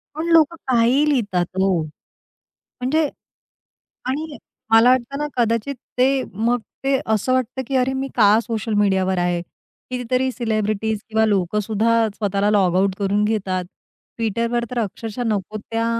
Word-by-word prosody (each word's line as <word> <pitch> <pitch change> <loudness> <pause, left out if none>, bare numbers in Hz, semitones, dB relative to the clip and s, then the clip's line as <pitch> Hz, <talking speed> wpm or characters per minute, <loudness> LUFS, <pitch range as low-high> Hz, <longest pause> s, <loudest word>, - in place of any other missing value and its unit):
पण 320 +2 -3
लोकं 330 0 +5
काहीही 255 +5 +3
लिहितात 200 -11 +1
हो, 190 -4 +2 0.8
म्हणजे 290 +4 -1 1.0
आणि 295 +3 -3 0.3
मला 225 +2 +6
वाटत 255 +2 +1
ना 295 0 -2
कदाचित 230 +3 0 0.2
ते 265 +1 +3
मग 235 +4 +1 0.2
ते 270 -1 +2
असं 235 +5 +1
वाटतं, 255 +1 -1
की 270 - -2
अरे 260 +1 +2
मी 265 +1 -2
का 215 -1 +5
सोशल 225 -1 -3
मीडियावर 190 -2 +2
आहे. 175 -1 0 0.5
कितीतरी 255 +1 -1
सेलिब्रिटीज 215 -2 -1
किंवा 220 0 +2
लोकं 200 -1 +1
सुद्धा 225 +2 +2
स्वतःला 205 -1 0
लॉग 185 -4 +3
आउट 190 0 +2
करून 200 +1 +1
घेतात. 190 -4 -1 0.5
Twitterवर 230 +2 0
तर 245 - -1
अक्षरशः 225 +3 -4
नको 215 0 -2
त्या 225 +2 -3
225 Hz, 145 wpm, -21 LUFS, 205-255 Hz, 1.0 s, मला